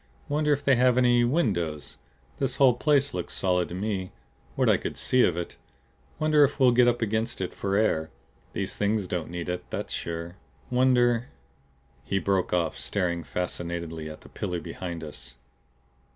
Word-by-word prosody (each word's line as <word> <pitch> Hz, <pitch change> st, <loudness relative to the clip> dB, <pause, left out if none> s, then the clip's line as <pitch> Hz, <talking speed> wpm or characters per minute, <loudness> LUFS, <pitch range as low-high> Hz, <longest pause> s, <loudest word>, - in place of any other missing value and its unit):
"Wonder 150 Hz, +1 st, +1 dB
if 145 Hz, 0 st, +1 dB
they 135 Hz, -3 st, +4 dB
have 125 Hz, 0 st, +4 dB
any 120 Hz, -1 st, +4 dB
windows? 95 Hz, -, 0 dB, 0.4 s
This 135 Hz, -2 st, 0 dB
whole 135 Hz, -3 st, +5 dB
place 140 Hz, +2 st, +2 dB
looked 90 Hz, -1 st, -4 dB
solid 90 Hz, -2 st, +1 dB
to 85 Hz, -, -6 dB
me 95 Hz, -1 st, -2 dB, 0.5 s
what -, -, +2 dB
I -, -, +5 dB
could -, -, -5 dB
see 130 Hz, -, +3 dB
of 85 Hz, -, +2 dB
it. 85 Hz, -, -5 dB, 0.6 s
Wonder 155 Hz, -1 st, +4 dB
if 145 Hz, +1 st, +1 dB
we'll 130 Hz, -2 st, +6 dB
get 120 Hz, 0 st, +5 dB
up 120 Hz, -1 st, +2 dB
against 110 Hz, +2 st, -1 dB
it 90 Hz, -1 st, -3 dB
for 100 Hz, 0 st, -2 dB
air? 80 Hz, -7 st, +1 dB, 0.4 s
These 100 Hz, 0 st, -3 dB
Things 105 Hz, 0 st, 0 dB
don't 85 Hz, -3 st, -3 dB
need 85 Hz, 0 st, -5 dB
it, 90 Hz, 0 st, -3 dB
that's -, -, -4 dB
sure. 85 Hz, +2 st, -5 dB, 0.3 s
Wonder 125 Hz, -1 st, +3 dB, 0.4 s
" 65 Hz, -2 st, -36 dB
He 95 Hz, -, +3 dB
broke 95 Hz, -1 st, 0 dB
off 90 Hz, -2 st, 0 dB
staring 85 Hz, -4 st, -1 dB
fascinatedly 85 Hz, -2 st, -4 dB
at 75 Hz, -, -10 dB
the -, -, -15 dB
pillar 90 Hz, -1 st, -3 dB
behind 85 Hz, +1 st, -6 dB
us. 65 Hz, -5 st, -8 dB
95 Hz, 175 wpm, -27 LUFS, 85-125 Hz, 0.6 s, we'll